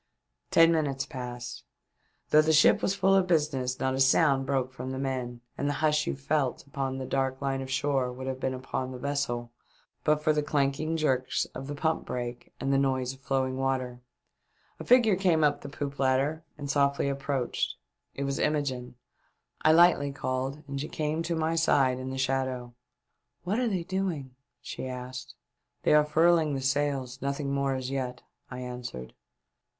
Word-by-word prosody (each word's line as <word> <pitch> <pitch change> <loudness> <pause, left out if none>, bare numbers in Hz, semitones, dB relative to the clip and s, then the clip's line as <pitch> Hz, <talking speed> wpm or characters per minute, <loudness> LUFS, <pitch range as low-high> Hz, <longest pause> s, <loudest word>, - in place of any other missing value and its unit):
Ten 165 0 +6
minutes 145 -5 0
passed. 125 -3 -7 0.7
Though 155 - +7
the 160 +1 +2
ship 155 - +6
was 195 - +1
full 195 -1 +3
of 190 -1 +4
business, 145 -6 0
not 130 0 0
a 130 - -2
sound 135 0 +4
broke 130 -2 0
from 130 0 -6
the 130 - -4
men, 130 -3 -3 0.2
and 145 - 0
the - - 0
hush 150 +1 +1
you - - -1
felt 140 -1 -1
upon 135 -1 -3
the 130 - -4
dark 135 0 -1
line 135 -1 -1
of 130 - -6
shore 135 -1 0
would 130 +1 -7
have 130 0 -3
been 130 0 -1
upon 130 0 -4
the 130 - -7
vessel 125 -3 -2 0.5
but 150 0 +2
for 155 - +4
the 150 - +1
clanking 150 +2 0
jerks 130 -5 +1
of 135 - -6
the 145 - -4
pump 160 +2 0
brake 120 -1 -5
and 135 0 0
the 135 - +4
noise 130 -2 0
of 135 - -16
flowing 130 -1 -1
water, 130 -2 -1 0.8
A - - -5
figure 235 -5 +5
came 175 -4 +2
up 145 -1 +2
the - - -7
poop 140 0 -5
ladder 135 +4 +1
and 145 -1 -5
softly 140 0 +2
approached. 140 -2 -1 0.4
It 140 - -3
was 140 0 -2
Imogene. 130 -5 -1 0.7
I 155 - +5
lightly 160 -4 +5
called 135 +2 -3
and 140 -1 -4
she 150 - -3
came 155 +1 -1
to 170 0 -1
my 160 0 0
side 135 -6 +3
in 130 0 -5
the 130 - -4
shadow. 130 -2 -1 0.3
" - - -52
What 195 +7 0
are 250 - +1
they 190 -6 -1
doing 170 -8 -3 0.2
?" - - -55
she - - -5
asked. 125 0 -7 0.2
" - - -51
They - - +4
are 150 0 +7
furling 160 0 +3
the 135 - -3
sails; 135 -1 -1
nothing 140 0 -2
more 140 -1 +1
as 130 0 -4
yet," 125 -2 -3 0.3
I 125 0 -6
answered. 125 - -7
135 Hz, 190 wpm, -28 LUFS, 130-150 Hz, 0.8 s, Though